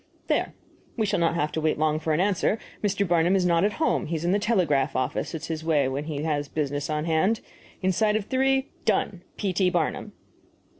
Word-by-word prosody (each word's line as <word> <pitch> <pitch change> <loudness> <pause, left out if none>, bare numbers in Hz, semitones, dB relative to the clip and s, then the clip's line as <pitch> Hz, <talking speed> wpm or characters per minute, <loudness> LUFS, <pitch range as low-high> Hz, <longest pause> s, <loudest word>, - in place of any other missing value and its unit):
"There. - - 0 0.4
We 220 - +1
shall 200 - 0
not 170 0 +2
have 150 -2 0
to 160 - -2
wait 155 0 +1
long 155 0 +1
for 160 0 -2
an 155 - +2
answer. 200 +2 +2 0.3
Mr. 200 -1 +1
Barnum 175 +2 +3
is 185 -2 +2
not 170 0 +3
at 205 +1 +2
home; 320 - 0
he 165 - -2
is 160 +1 -3
in 175 - +2
the 200 - +3
telegraph 155 - +1
office 130 +5 -1
it 160 - -6
is - - -5
his 160 -1 -4
way 150 -4 +2
when 135 +3 -3
he 150 -2 -4
has 145 -2 -1
business 145 0 -2
on 150 0 -1
hand. 180 +7 +2 0.4
Inside 210 +3 +2
of 215 -2 -1
three 265 +2 +1
" - - -33
Done. 185 -2 -3 0.2
P. 195 -3 -1
T. 185 0 +3
BARNUM. 175 -3 -1
170 Hz, 230 wpm, -26 LUFS, 155-200 Hz, 0.4 s, Barnum